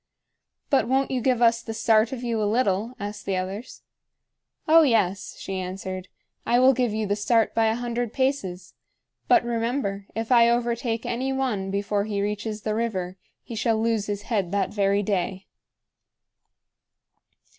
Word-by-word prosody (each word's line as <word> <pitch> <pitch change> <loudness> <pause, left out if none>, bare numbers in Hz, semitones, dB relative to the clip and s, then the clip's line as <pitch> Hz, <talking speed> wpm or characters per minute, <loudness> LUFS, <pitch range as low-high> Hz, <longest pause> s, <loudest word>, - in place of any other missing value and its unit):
"But 270 -4 +3
won't 265 +2 +1
you 255 -2 0
give 245 -1 +2
us 230 0 +4
the 225 -2 -6
start 220 0 +3
of 255 -2 -5
you 230 -2 -1
a 205 - +1
little?" 225 0 0
asked 205 0 -6
the 190 -1 0
others. 195 +6 -6 0.8
"Oh, 325 +1 +7
yes," 215 - +1
she 190 -1 -4
answered. 185 0 -5 0.4
"I 240 - +2
will 260 +2 +6
give 245 -2 0
you 215 0 -1
the 205 0 0
start 225 +2 +2
by 225 -1 +3
a 220 - +1
hundred 240 -1 -3
paces. 195 -10 -2 0.5
But 355 -8 +4
remember, 230 -4 -2
if 225 +2 -3
I 235 -1 +6
overtake 235 -1 -1
any 255 +3 -2
one 250 -8 -1
before 200 +1 -1
he 210 -2 -2
reaches 210 +1 -3
the 215 - -1
river, 190 -5 -2 0.3
he - - -9
shall 225 0 +1
lose 225 -2 0
his 205 -1 -3
head 200 -6 -1
that 200 -1 0
very 200 0 +2
day." 190 -1 -2
220 Hz, 165 wpm, -25 LUFS, 200-240 Hz, 0.8 s, Oh